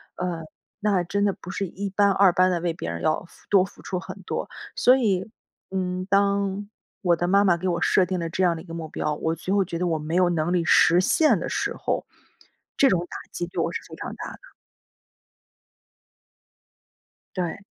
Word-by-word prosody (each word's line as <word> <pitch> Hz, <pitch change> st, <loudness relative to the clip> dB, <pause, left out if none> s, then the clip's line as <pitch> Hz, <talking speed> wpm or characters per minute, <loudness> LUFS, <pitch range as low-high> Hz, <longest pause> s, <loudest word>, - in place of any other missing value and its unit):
呃， 175 Hz, -3 st, -3 dB, 0.4 s
那 205 Hz, -4 st, +2 dB
真 200 Hz, +4 st, 0 dB
的 200 Hz, -, +2 dB
不 180 Hz, -, -9 dB
是 195 Hz, 0 st, -2 dB
一 200 Hz, +3 st, -5 dB
般 200 Hz, +1 st, +3 dB
二 195 Hz, -1 st, +5 dB
般 185 Hz, +1 st, +4 dB
地 175 Hz, -, 0 dB
为 170 Hz, -1 st, 0 dB
别 85 Hz, -, -5 dB
人 85 Hz, 0 st, -4 dB
要 155 Hz, -, +1 dB
付 -, -, -21 dB
多 195 Hz, -2 st, +5 dB
付 -, -, -15 dB
出 185 Hz, -2 st, -3 dB
很 -, -, -9 dB
多。 -, -, -4 dB, 0.3 s
所 250 Hz, -, +6 dB
以， 200 Hz, -6 st, 0 dB, 0.4 s
嗯， 185 Hz, -1 st, -2 dB
当 200 Hz, 0 st, +1 dB, 0.3 s
我 175 Hz, -3 st, +3 dB
的 175 Hz, +2 st, -1 dB
妈 200 Hz, +2 st, +4 dB
妈 175 Hz, -3 st, +4 dB
给 185 Hz, +2 st, -3 dB
我 175 Hz, -1 st, 0 dB
设 185 Hz, -, +4 dB
定 185 Hz, +1 st, -2 dB
了 165 Hz, -1 st, -3 dB
这 180 Hz, +3 st, -1 dB
样 170 Hz, -2 st, +3 dB
的 160 Hz, -, -7 dB
一 180 Hz, -, -14 dB
个 165 Hz, -, -9 dB
目 165 Hz, -1 st, -5 dB
标， 150 Hz, 0 st, -2 dB
我 160 Hz, +2 st, -1 dB
最 180 Hz, +4 st, -3 dB
后 195 Hz, -2 st, +3 dB
觉 170 Hz, -1 st, -4 dB
得 180 Hz, -, 0 dB
我 160 Hz, -2 st, 0 dB
没 155 Hz, +3 st, -3 dB
有 180 Hz, -1 st, +4 dB
能 170 Hz, +1 st, 0 dB
力 175 Hz, -, +2 dB
实 175 Hz, +2 st, +5 dB
现 305 Hz, -, +4 dB
的 -, -, -4 dB
时 -, -, -1 dB
候， -, -, -2 dB, 0.7 s
这 275 Hz, -, +6 dB
种 180 Hz, -, +2 dB
打 -, -, -6 dB
击 175 Hz, -, -3 dB
对 175 Hz, -, -3 dB
我 -, -, -1 dB
是 -, -, -3 dB
非 -, -, -9 dB
常 -, -, -6 dB
大 -, -, -7 dB
的。 -, -, -14 dB, 3.0 s
对。 175 Hz, -2 st, -2 dB
180 Hz, 230 characters per minute, -25 LUFS, 170-195 Hz, 3.0 s, 所